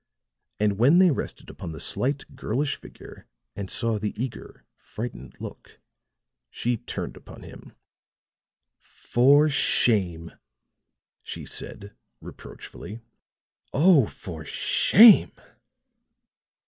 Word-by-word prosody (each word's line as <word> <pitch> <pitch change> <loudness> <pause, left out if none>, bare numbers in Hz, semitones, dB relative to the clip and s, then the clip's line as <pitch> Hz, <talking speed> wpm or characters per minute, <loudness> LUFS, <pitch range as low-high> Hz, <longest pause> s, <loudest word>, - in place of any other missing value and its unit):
And 105 -1 0
when 140 +9 +5
they 185 -2 +5
rested - - -6
upon 80 - -8
the 80 - -9
slight, 135 - -2
girlish 140 +6 -2
figure - - -14 0.3
and 100 -2 -6
saw 115 -2 0
the 105 0 -5
eager, 125 0 -7
frightened 105 - -9
look, - - -11 0.7
she 120 - -2
turned 120 +2 -6
upon - - -14
him. - - -13 1.1
"For 140 +5 +2
shame," 95 - +1 0.9
she - - -8
said, 100 +1 -6 0.3
reproachfully. 110 +3 -11 0.7
"Oh, 150 - +5
for 80 -4 -9
shame!" 215 - +5
115 Hz, 95 wpm, -25 LUFS, 100-140 Hz, 1.1 s, when